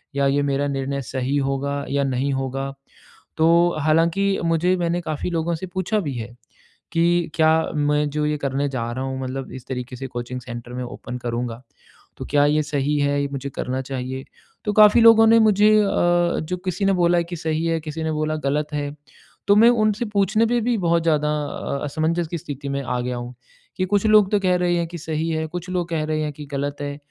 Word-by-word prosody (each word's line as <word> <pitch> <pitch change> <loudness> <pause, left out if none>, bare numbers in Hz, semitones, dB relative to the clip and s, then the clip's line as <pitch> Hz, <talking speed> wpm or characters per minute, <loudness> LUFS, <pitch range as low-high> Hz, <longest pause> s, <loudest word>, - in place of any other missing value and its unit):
या 140 0 +2
ये 140 +1 +2
मेरा 140 0 0
निर्णय 140 0 -2
सही 130 +2 -2
होगा 140 +1 -2
या 140 0 +1
नहीं 135 +1 -1
होगा? 135 +1 -3 0.6
तो 160 - +4 0.3
हालाँकि 170 +6 +2
मुझे 165 +2 +2
मैंने 175 0 -1
काफ़ी 155 0 -3
लोगों 165 0 -1
से 185 - -6
पूछा 185 +4 -1
भी 145 -8 -3
है 120 0 -6 0.6
कि 170 0 +2
क्या 160 0 +4 0.3
मैं 150 0 +1
जो 150 +1 -1
ये 150 0 0
करने 140 0 -1
जा 120 -3 -3
रहा 130 +2 -4
हूँ, 130 0 -4
मतलब 130 +1 -5
इस 130 -2 -9
तरीके 125 -1 -5
से 135 +2 -6
कोचिंग 120 0 -5
सेंटर 120 -1 -8
मैं 125 0 -4
ओपन 125 0 -7
करूँगा, 120 0 -4 0.6
तो - - -6
क्या 145 -1 +4
ये 150 +1 +2
सही 145 0 -1
है, 145 0 +1
ये 140 - -1
मुझे 140 0 -4
करना 130 0 -3
चाहिए? 130 0 -5 0.4
तो 210 - 0
काफ़ी 215 +2 +7
लोगों 225 -1 +7
ने 230 0 +6
मुझे 210 -1 +5
अ, 200 - +1 0.5
जो 180 +3 -3
किसी 185 +2 -1
ने 195 - +3
बोला 175 -1 +3
है - - 0
कि 175 +1 -6
सही 160 0 -2
है, 165 0 +1
किसी 155 +1 -5
ने 160 - -1
बोला 155 0 -1
गलत 150 +2 -1
है, 145 -1 -2 0.6
तो 200 - +6
मैं 230 +2 +7
उनसे 215 -1 +1
पूछने 205 +3 +2
पे 240 0 +1
भी 240 0 +1
बहुत 170 0 +2
ज़्यादा 150 -2 +2 0.2
अ, 140 -1 -4
असमंजस 160 +3 -1
की 170 - -3
स्थिति 140 -1 -6
में 140 0 -2
आ 125 0 -2
गया 125 0 -3
हूँ 120 +1 -6 0.4
कि 185 - +1
कुछ 205 +1 +2
लोग 210 -2 +5
तो 205 - +3
कह 185 -2 +2
रहे 175 -1 +1
हैं 170 -1 -1
कि 170 - -8
सही 160 0 -3
है, 160 0 -1
कुछ 175 +2 -6
लोग 180 -2 -2
कह 160 -2 -1
रहे 155 0 -1
हैं 150 - -2
कि 150 +1 -9
गलत 140 +1 -3
है। 145 0 -4
150 Hz, 220 wpm, -22 LUFS, 135-175 Hz, 0.6 s, काफ़ी